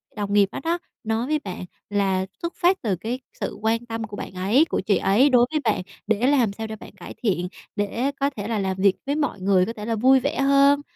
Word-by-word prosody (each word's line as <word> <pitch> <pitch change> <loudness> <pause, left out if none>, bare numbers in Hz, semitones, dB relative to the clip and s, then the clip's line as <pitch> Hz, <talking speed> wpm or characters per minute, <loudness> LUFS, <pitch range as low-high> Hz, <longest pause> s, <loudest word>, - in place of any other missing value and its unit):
đồng 205 -1 -3
nghiệp 200 -1 +4
đó - - -5
đó 335 +1 +1 0.3
nói 225 +2 -1
với 305 +1 +1
bạn 185 -8 -7 0.2
là 195 -2 +1 0.2
xuất 340 0 -3
phát 365 +2 +2
từ 205 -5 0
cái 225 +8 -4 0.2
sự - - -3
quan 225 +2 0
tâm 225 -1 -4
của 210 -1 -7
bạn - - -7
ấy 200 - +3
của - - -2
chị 205 - +2
ấy 230 +9 +4
đối 245 -2 +5
với 310 - +1
bạn 215 -5 +1 0.3
để 220 +3 +2
làm 255 -8 +3
sao 220 +2 -5
để 220 - -6
bạn - - -12
cải 190 - -10
thiện, 180 -5 +1 0.3
để 230 +7 -1
có 280 0 +2
thể 210 -7 -6
là 225 -2 -1
làm 190 -1 -1
việc 190 0 +4
với 280 +1 0
mọi 290 -9 -1
người 185 -1 +3
có 230 - -4
thể 210 -2 -7
là 225 0 0
vui 260 +4 +5
vẻ - - -2
hơn, 280 +1 +5
225 Hz, 250 wpm, -23 LUFS, 200-270 Hz, 0.3 s, đối